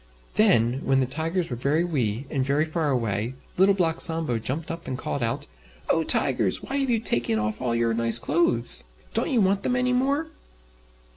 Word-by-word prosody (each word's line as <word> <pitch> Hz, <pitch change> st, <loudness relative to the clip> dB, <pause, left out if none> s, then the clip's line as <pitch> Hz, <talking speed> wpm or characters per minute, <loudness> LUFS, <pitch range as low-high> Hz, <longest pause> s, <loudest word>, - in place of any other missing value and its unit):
Then, 135 Hz, -, +3 dB
when 135 Hz, 0 st, +2 dB
the 130 Hz, -, +2 dB
Tigers 165 Hz, +5 st, -3 dB
were -, -, -2 dB
very 140 Hz, +7 st, 0 dB
wee 130 Hz, -8 st, -2 dB
and 135 Hz, -4 st, 0 dB
very 140 Hz, +3 st, +1 dB
far 160 Hz, -1 st, -2 dB
away, 115 Hz, -2 st, -2 dB, 0.2 s
Little 195 Hz, +2 st, +4 dB
Black 165 Hz, -3 st, +1 dB
Sambo 160 Hz, -8 st, +3 dB
jumped 145 Hz, +9 st, -4 dB
up 165 Hz, 0 st, -8 dB
and 130 Hz, -, -4 dB
called 140 Hz, -, -4 dB
out, 115 Hz, 0 st, -1 dB, 0.5 s
"Oh! 165 Hz, -, +1 dB
Tigers! 120 Hz, -11 st, +1 dB
why 275 Hz, -, -3 dB
have 270 Hz, -2 st, 0 dB
you 235 Hz, -, +2 dB
taken 120 Hz, -, 0 dB
off 105 Hz, +1 st, -3 dB
all 120 Hz, -2 st, -1 dB
your 115 Hz, 0 st, +1 dB
nice 115 Hz, 0 st, +3 dB
clothes? 340 Hz, -1 st, +2 dB, 0.3 s
Don't -, -, 0 dB
you 250 Hz, -6 st, +2 dB
want 195 Hz, 0 st, +1 dB
them 250 Hz, -, -1 dB
any 250 Hz, 0 st, +1 dB
more?" 280 Hz, +5 st, 0 dB
150 Hz, 195 wpm, -24 LUFS, 120-190 Hz, 0.5 s, Little